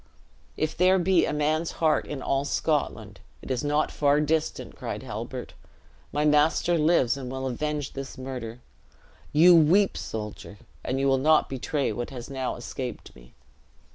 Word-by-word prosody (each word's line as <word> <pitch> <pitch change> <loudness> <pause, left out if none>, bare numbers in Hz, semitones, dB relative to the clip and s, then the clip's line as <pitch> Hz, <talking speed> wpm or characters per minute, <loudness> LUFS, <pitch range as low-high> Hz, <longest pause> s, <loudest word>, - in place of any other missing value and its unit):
"If 155 0 -1
there 185 +2 +4
be 180 -1 +3
a - - -1
man's 155 +2 0
heart 160 -2 +1
in 140 -3 -5
all 135 0 0
Scotland, 150 +1 -2 0.2
it - - -6
is 130 +1 -1
not 150 +1 +1
far 145 0 +2
distant!" 155 +1 -1
cried - - -5
Halbert. - - -6 0.6
"My 150 +1 0
master 150 +3 +3
lives, 150 -6 +3
and 130 -2 -6
will 130 0 -4
avenge 145 +3 -3
this 135 +1 -7
murder. 125 -3 -6 0.7
You 170 +4 +7
weep, 175 +6 +4
soldier; 105 -2 -6 0.3
and 130 +1 -2
you 135 - +1
will 135 -1 +3
not 155 +3 +3
betray 135 +2 -2
what 120 - -4
has 125 -1 -8
now 130 -1 -3
escaped 125 0 -7
me." 60 0 -18
145 Hz, 160 wpm, -26 LUFS, 130-155 Hz, 0.7 s, You